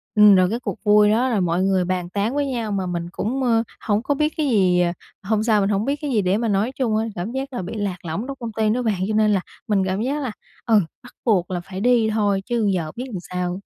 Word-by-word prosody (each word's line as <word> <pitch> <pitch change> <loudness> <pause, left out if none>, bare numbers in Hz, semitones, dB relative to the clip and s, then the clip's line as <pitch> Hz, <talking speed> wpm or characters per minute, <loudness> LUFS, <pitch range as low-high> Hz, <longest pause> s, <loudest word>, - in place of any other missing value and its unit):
Ừm, 210 -1 +8
rồi 185 -1 +4
cái 230 +4 -2
cuộc 235 - -6
vui 210 0 +5
đó 245 +4 +2
là 220 -4 +1
mọi 175 0 +1
người 190 -2 +2
bàn 180 -1 -2
tán 205 +7 -1
với 290 -1 +1
nhau 235 -5 -3
mà 195 -2 -1
mình 175 -1 -3
cũng, 260 +9 -2
ờ, 230 -2 +3 0.2
hông 210 +1 0
có 285 - 0
biết 300 +2 0
cái 305 - +1
gì, 185 -6 +3
à 175 0 +1 0.3
hôm 215 +1 0
sao, 215 -3 +3
mình 195 - +1
hông 205 +1 0
biết 280 +2 0
cái 290 - -3
gì 220 -4 +2
để 185 +2 +1
mà 230 - -1
nói 210 +3 +1
chung 230 -5 0
á, 220 - 0
cảm 180 +6 -4
giác 270 +1 -4
là 245 - -3
bị 185 - -6
lạc 200 -3 -2
lõng 170 +9 -3
trong 275 -1 -6
công 235 -2 -5
ty 220 0 0
đó 245 +4 +1
bạn 210 -6 -1
cho 215 - -1
nên 215 -1 +3
là 195 - +1 0.3
mình 200 -3 +2
cảm 190 +2 -1
giác 280 +5 -1
là, 245 - -2 0.3
ừ, 225 -3 +5 0.2
bắt 245 - -14
buộc 190 -6 +2
là 175 - -2
phải 185 +2 -8
đi 235 -2 +3
thôi 205 -3 +1
chứ 235 -4 0
giờ 160 -4 -2
biết 250 - -5
làm 190 - -4
sao. 180 +1 -4
210 Hz, 285 wpm, -22 LUFS, 185-235 Hz, 0.3 s, Ừm